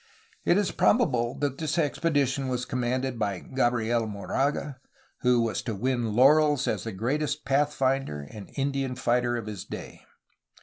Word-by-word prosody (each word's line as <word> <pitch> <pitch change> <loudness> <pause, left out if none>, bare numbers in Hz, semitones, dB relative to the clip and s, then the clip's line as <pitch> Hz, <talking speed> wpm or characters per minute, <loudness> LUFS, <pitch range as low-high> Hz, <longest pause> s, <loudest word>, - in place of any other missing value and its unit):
It 175 - +4
is 205 -2 +1
probable 125 - +2
that 140 -2 -1
this 155 0 -1
expedition 145 -4 +1
was 125 -1 -2
commanded 125 0 -2
by 100 -3 0
Gabriel 120 0 0
Moraga, 135 +6 -2 0.4
who 125 -1 +3
was 110 -3 -1
to 115 -4 -4
win 120 0 -1
laurels 145 +2 +5
as - - -1
the 115 - -3
greatest 145 +9 -2
pathfinder 135 - +1
and 105 +2 -10
Indian 135 -2 -1
fighter 120 0 +1
of 115 - -5
his 105 -4 -6
day. - - -8
130 Hz, 145 wpm, -27 LUFS, 115-140 Hz, 0.4 s, laurels